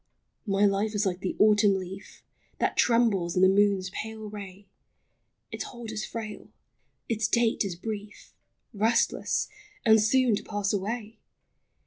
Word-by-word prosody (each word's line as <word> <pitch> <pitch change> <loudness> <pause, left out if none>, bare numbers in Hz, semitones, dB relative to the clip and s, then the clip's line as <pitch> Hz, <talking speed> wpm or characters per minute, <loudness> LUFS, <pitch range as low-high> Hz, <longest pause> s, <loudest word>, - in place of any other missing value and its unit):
231 205 - -3 0.2
My 195 - 0
life 215 - -8
is 205 0 +1
like 180 -2 -1
the 185 - -3
autumn 210 -1 +5
leaf 190 +1 -8 0.3
That - - 0
trembles 220 -8 +2
in 185 - +3
the - - +8
moon's 195 -1 +2
pale 220 0 -6
ray; 200 -1 -9 0.9
Its - - -4
hold 240 -3 -8
is 215 -1 -4
frail, 215 -2 -7 0.3
— - - -47
its 225 -2 0
date 235 -1 +2
is 195 -3 -4
brief, 205 +2 -7 0.4
Restless, 225 +3 +1 0.4
and 220 -1 +6
soon 245 +1 +3
to - - -8
pass 205 -1 -2
away 215 +2 -4
210 Hz, 150 wpm, -27 LUFS, 195-220 Hz, 0.9 s, the